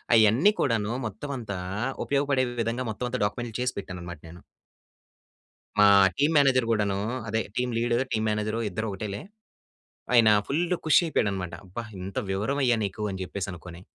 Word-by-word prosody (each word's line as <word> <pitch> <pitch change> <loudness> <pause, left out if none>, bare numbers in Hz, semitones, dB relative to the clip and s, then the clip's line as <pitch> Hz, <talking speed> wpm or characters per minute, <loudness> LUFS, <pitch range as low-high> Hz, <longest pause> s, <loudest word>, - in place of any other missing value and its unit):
అయన్నీ 115 - +5
కూడాను 115 -4 +1
మొత్తం 110 +8 -7
అంతా 105 -6 -5 0.5
ఉపయోగపడే 140 -2 +1 0.2
విధంగా 115 +3 -2
మొత్తం 125 +3 -4
అంతా - - -3
డాక్యుమెంట్‌లు 115 +2 -4
చేసి 125 - -1
పెట్టాననమాట 90 -3 -7
నేను. 85 +1 -12 1.4
మా 105 0 +7 0.3
టీం 145 +3 +3
మేనేజర్ 130 -4 +4
గూడాను 100 -3 +1 0.3
అదే 110 0 0
టీం 125 0 0
లీడర్, 120 +2 +1
టీం 110 -2 0
మేనేజరు 105 +1 -1
ఇద్దరు 110 +2 -3
ఒకటేలే. 100 +1 -5 0.9
ఆయన 115 -3 +7 0.2
ఫుల్లు 175 +5 0
ఖుషి 155 - +6
అయిపోయాడనమాట. 100 - -1
అబ్బా! 95 +6 -6 0.2
ఎంత 95 +1 -7
వివరమయ్యా 120 +5 +1
నీకు 100 +2 -6
అని 95 - -6
జెప్పేసనుకొని. 90 -2 -6
110 Hz, 140 wpm, -26 LUFS, 100-125 Hz, 1.4 s, మా